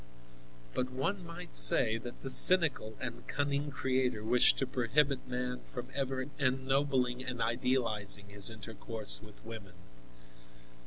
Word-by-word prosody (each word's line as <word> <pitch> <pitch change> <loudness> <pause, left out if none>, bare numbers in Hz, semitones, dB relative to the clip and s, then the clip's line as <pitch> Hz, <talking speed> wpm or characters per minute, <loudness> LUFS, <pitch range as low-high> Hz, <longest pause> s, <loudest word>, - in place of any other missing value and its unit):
But 125 0 -2
one 160 +10 -4
might 170 0 -10
say 115 -2 +6
that 120 +1 -10
the 135 - -4
cynical 145 -10 +5
and 125 -2 -8
cunning 145 +1 -2
Creator 130 -5 -2
wished 120 +3 +3
to 135 - -1
prohibit 130 +2 -1
man 125 0 -5
from 125 0 -8
ever 135 -1 -3
ennobling 130 -1 -1
and 130 -2 -6
idealizing 115 -4 -1
his 100 0 +2
intercourse 110 0 -3
with 105 -1 -17
women. 110 -5 -11
125 Hz, 125 wpm, -31 LUFS, 115-135 Hz, -, say